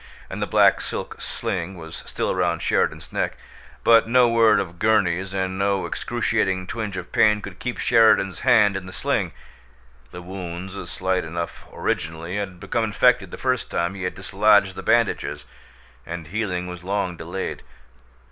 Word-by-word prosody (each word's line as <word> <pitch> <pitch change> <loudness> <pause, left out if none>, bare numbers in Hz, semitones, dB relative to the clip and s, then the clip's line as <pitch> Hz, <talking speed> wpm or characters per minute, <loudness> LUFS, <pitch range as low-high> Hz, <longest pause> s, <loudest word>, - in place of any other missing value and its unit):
And - - -5
the - - 0
black - - +4
silk - - -6
sling 90 +1 -4
was 80 -1 -8
still - - -1
round 85 -2 0
Sheridan's - - 0
neck, - - -1 0.5
but 115 -1 +6
no 125 +1 +5
word 115 -2 +5
of 85 -3 -5
Gurney's 95 -4 +2
and 95 -1 -2
no 100 -1 +1
excruciating 95 -1 -1
twinge 105 -1 -4
of 90 -1 -7
pain 105 -1 +4
could 100 -3 -9
keep 125 -1 -4
Sheridan's 105 -4 +4
hand 105 -6 +4
in 95 -1 -5
the 95 - -9
sling. - - -1 0.8
The 90 - -9
wounds, 90 0 -6 0.2
slight 95 0 -1
enough 85 +1 -5
originally, 80 +3 -3
had 95 -3 -4
become 115 +5 -1
infected 105 -2 +3
the - - -8
first 130 -2 -1
time 85 +2 -1
he 100 - -8
had 90 - -3
dislodged - - +3
the - - -6
bandages, - - +1 0.6
and 85 +3 -6
healing 95 -3 -2
was 90 -1 -8
long 95 -2 -1
delayed. 85 +3 -5
95 Hz, 160 wpm, -23 LUFS, 90-105 Hz, 0.8 s, but